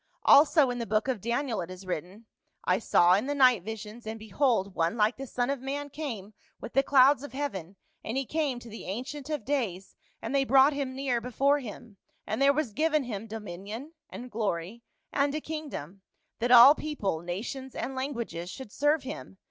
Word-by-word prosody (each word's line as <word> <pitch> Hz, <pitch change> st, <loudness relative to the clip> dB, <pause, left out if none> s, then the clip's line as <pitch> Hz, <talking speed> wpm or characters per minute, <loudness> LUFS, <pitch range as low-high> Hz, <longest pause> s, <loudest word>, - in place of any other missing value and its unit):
Also 285 Hz, -1 st, +6 dB
in 245 Hz, -, -4 dB
the 230 Hz, -, -3 dB
book 215 Hz, +3 st, +1 dB
of 255 Hz, -7 st, -1 dB
Daniel 235 Hz, 0 st, -1 dB
it 170 Hz, -, -6 dB
is 185 Hz, +1 st, -10 dB
written 185 Hz, +5 st, -5 dB, 0.2 s
' -, -, -48 dB
I -, -, +2 dB
saw 175 Hz, +1 st, +4 dB
in 205 Hz, +8 st, +1 dB
the 290 Hz, -, -1 dB
night 255 Hz, -7 st, +5 dB
visions, 220 Hz, +3 st, -8 dB
and 220 Hz, +1 st, -4 dB
behold 220 Hz, -2 st, 0 dB
one 165 Hz, +6 st, 0 dB
like 215 Hz, +2 st, +3 dB
the 270 Hz, 0 st, -7 dB
son 245 Hz, +2 st, -1 dB
of 280 Hz, -, -2 dB
man 285 Hz, +2 st, -4 dB
came 230 Hz, -9 st, -6 dB, 0.3 s
with -, -, -8 dB
the 270 Hz, -, +5 dB
clouds 275 Hz, 0 st, +5 dB
of 285 Hz, -, -9 dB
heaven, 200 Hz, -, -4 dB, 0.3 s
and 225 Hz, +4 st, -3 dB
he 270 Hz, -, -1 dB
came 295 Hz, -3 st, -1 dB
to 240 Hz, -, -12 dB
the 225 Hz, 0 st, -9 dB
Ancient 260 Hz, +8 st, -5 dB
of 300 Hz, -8 st, -3 dB
days, 220 Hz, -10 st, -2 dB, 0.2 s
and 225 Hz, +4 st, -5 dB
they 275 Hz, -1 st, +3 dB
brought 270 Hz, +2 st, +5 dB
him 275 Hz, -2 st, -3 dB
near 260 Hz, -3 st, -1 dB
before 275 Hz, +4 st, +2 dB
him. 225 Hz, -3 st, -10 dB, 0.3 s
And 220 Hz, -, -3 dB
there 275 Hz, 0 st, +6 dB
was 280 Hz, -6 st, -2 dB
given 305 Hz, +2 st, +1 dB
him 225 Hz, -3 st, -5 dB
dominion, 215 Hz, -, -7 dB, 0.2 s
and 245 Hz, 0 st, -9 dB
glory, 205 Hz, 0 st, -3 dB, 0.3 s
and 280 Hz, 0 st, +1 dB
a -, -, 0 dB
kingdom, 290 Hz, -, -7 dB, 0.4 s
that 240 Hz, +2 st, 0 dB
all 245 Hz, +3 st, +10 dB
people, 290 Hz, -, -3 dB
nations, 220 Hz, +10 st, -6 dB
and 270 Hz, -, -3 dB
languages 235 Hz, -10 st, -4 dB
should 245 Hz, +1 st, -9 dB
serve 295 Hz, +4 st, +1 dB
him. 260 Hz, -7 st, -8 dB
245 Hz, 200 wpm, -28 LUFS, 210-280 Hz, 0.4 s, all